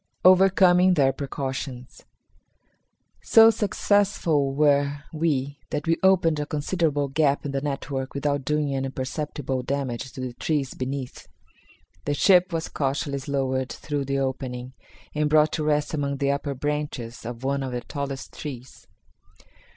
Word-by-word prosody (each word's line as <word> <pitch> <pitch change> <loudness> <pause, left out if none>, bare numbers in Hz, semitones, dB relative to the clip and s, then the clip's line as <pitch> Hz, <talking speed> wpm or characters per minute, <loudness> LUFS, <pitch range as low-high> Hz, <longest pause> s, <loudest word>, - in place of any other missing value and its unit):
Overcoming 185 -1 +6
Their 135 -3 +3
Precautions. 130 -2 -5 1.2
So 225 0 +7
successful 200 -9 +1
were 145 0 +2
we 145 -3 -1
that 150 -1 -3
we 165 0 +2
opened 180 -5 +3
a 150 - -3
considerable 150 -1 0
gap 145 0 +1
in 140 - -2
the 135 0 -2
network 135 -2 -4
without 145 0 -1
doing 150 0 0
any 135 0 -1
perceptible 135 0 -3
damage 130 -1 -3
to 130 - -7
the 130 -1 -4
trees 140 0 -1
beneath. 130 0 -5 0.8
The 145 - 0
ship 180 +3 +5
was 165 -1 -2
cautiously 140 0 -2
lowered 130 -1 -1
through 145 -2 -3
the 140 +1 -1
opening 130 -1 -3 0.4
and 150 0 0
brought 155 0 +4
to 155 - -2
rest 150 0 0
among 140 -2 -1
the 140 0 +1
upper 140 0 -2
branches 145 -4 -4
of 120 +1 -7
one 140 +1 0
of 130 -1 -3
the 125 -1 -3
tallest 140 0 -5
trees. 130 -4 -9
140 Hz, 145 wpm, -25 LUFS, 135-150 Hz, 1.2 s, So